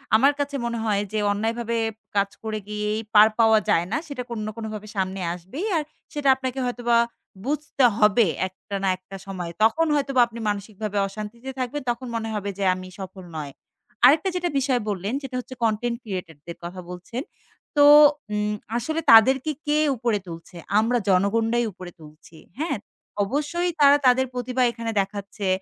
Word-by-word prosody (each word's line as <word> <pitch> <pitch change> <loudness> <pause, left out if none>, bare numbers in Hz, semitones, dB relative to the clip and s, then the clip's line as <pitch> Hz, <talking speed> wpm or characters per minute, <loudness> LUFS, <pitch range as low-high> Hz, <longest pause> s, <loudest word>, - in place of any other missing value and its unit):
আমার 275 +6 +5
কাছে 285 0 -2
মনে 235 0 -2
হয় 205 -2 +1
যে, 215 - -1
অন্যায়ভাবে 225 +3 -1 0.4
কাজ 200 0 +2
করে 215 -1 -3
গিয়েই 210 0 -2
পার 210 0 +8
পাওয়া 220 -1 +6
যায় 165 - +3
না। - - +1
সেটা 275 -4 -5
কোন 235 -2 -4
না - - -3
কোনভাবে 215 -2 -6
সামনে 190 0 -2
আসবেই। 190 - -6
আর 310 - 0 0.3
সেটা 290 -2 +1
আপনাকে 260 0 -4
হয়তোবা 240 -1 +1 0.5
বুঝতে 295 -1 -1
হবে 210 +1 +5 0.2
একটা 190 +2 -9
না 195 - +2
একটা 185 +1 -12
সময়। 180 -3 -5
তখন 315 +10 +4
হয়তোবা 275 -3 +2
আপনি 235 0 -10
মানসিকভাবে 205 0 -4
অশান্তিতে 215 +5 -8
থাকবেন, 255 +3 -2
তখন 245 +2 -6
মনে 225 -1 -2
হবে 205 -1 -3
যে, 200 - -2
আমি 185 0 -8
সফল 190 0 -8
নয়। 145 -2 -5 0.5
আরেকটা 310 +8 +5
যেটা 355 -1 0
বিষয় 260 -2 +1
বললেন, 200 +2 -2
সেটা 265 -2 -7
হচ্ছে 260 +1 -8
কনটেন্ট 230 +2 0
ক্রিয়েটর 180 -7 -6
দের 170 - -7
কথা 175 +2 -7
বলছেন। 180 +8 -6 0.6
তো 290 - +7 0.5
উ - - 0 0.4
আসলে 315 +7 -2
তাদেরকে, 260 +6 +6
কে 295 0 +2 0.2
উপরে 230 -2 0
তুলছে, 165 +1 -10 0.2
আমরা 235 +3 +2
জনগণরাই 225 +5 +2
উপরে 180 -1 -10
তুলছি। 155 +1 -15 0.2
হ্যাঁ, 320 +3 -1 0.5
অবশ্যই 295 - -1
তারা 285 0 +7
তাদের 255 +1 +4
প্রতিভা 250 +1 -1
এখানে 230 -1 -4
দেখাচ্ছে, 200 0 -5
225 Hz, 165 wpm, -24 LUFS, 200-255 Hz, 0.6 s, পার